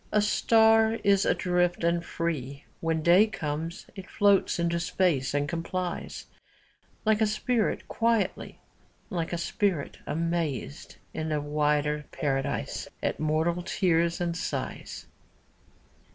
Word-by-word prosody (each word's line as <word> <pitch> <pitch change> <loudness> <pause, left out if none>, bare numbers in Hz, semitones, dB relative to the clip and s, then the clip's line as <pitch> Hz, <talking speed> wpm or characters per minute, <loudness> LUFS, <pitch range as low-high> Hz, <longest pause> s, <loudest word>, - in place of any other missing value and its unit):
A 210 - +3
star 220 +1 +4
is 200 0 +4
adrift 180 -1 +1
and 170 0 +1
free. 145 -6 -4
When 160 -1 -1
day 180 +6 +6
comes, 165 -2 -4
it 195 -2 -9
floats 205 -6 +3
into 170 0 0
space 170 -6 0
and 145 0 +1
com 170 +1 -3
plies; 180 +1 -4 0.8
Like 215 0 +3
a 220 - +4
spirit 220 +1 0
quietly, 230 -4 0 0.5
Like 170 -2 -2
a 175 - -1
spirit, 170 -3 -1
amazed 165 - -3 0.2
in 160 0 -3
a 150 - +1
wider 150 0 0
paradise 135 -1 -2 0.2
At - - -1
mortal 160 +3 0
tears 170 -2 +1
and 170 -1 -1
sighs. - - -5
170 Hz, 125 wpm, -27 LUFS, 155-195 Hz, 0.8 s, day